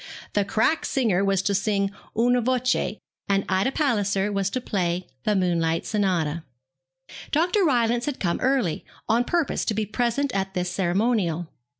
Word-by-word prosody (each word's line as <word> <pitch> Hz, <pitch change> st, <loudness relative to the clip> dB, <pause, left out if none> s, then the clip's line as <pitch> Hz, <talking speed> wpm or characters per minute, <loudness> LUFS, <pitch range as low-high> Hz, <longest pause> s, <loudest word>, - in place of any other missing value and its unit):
The 205 Hz, -, +2 dB
crack 225 Hz, +10 st, +1 dB
singer 215 Hz, -8 st, +1 dB
was 195 Hz, -1 st, +1 dB
to 200 Hz, -, +1 dB
sing 200 Hz, 0 st, 0 dB, 0.3 s
'Una 245 Hz, +2 st, +3 dB
voce,' 255 Hz, -2 st, 0 dB, 0.3 s
and 195 Hz, 0 st, +2 dB
Ida 190 Hz, +7 st, +1 dB
Palliser 205 Hz, -9 st, +1 dB
was 195 Hz, -1 st, 0 dB
to 255 Hz, -, -2 dB
play 180 Hz, -6 st, -1 dB, 0.2 s
the 210 Hz, -, +2 dB
'Moonlight 165 Hz, -3 st, +1 dB
Sonata.' 170 Hz, -7 st, 0 dB, 0.9 s
Dr. 355 Hz, +6 st, +2 dB
Rylance 240 Hz, -5 st, +2 dB
had 290 Hz, -, -3 dB
come 170 Hz, -3 st, 0 dB
early, 255 Hz, -, +1 dB, 0.2 s
on 235 Hz, +2 st, +3 dB
purpose 335 Hz, +3 st, 0 dB
to 220 Hz, -, -1 dB
be 215 Hz, 0 st, 0 dB
present 240 Hz, +6 st, 0 dB
at 195 Hz, -1 st, -2 dB
this 180 Hz, -1 st, -1 dB
ceremonial. 180 Hz, -3 st, 0 dB
205 Hz, 155 wpm, -24 LUFS, 185-245 Hz, 0.9 s, Una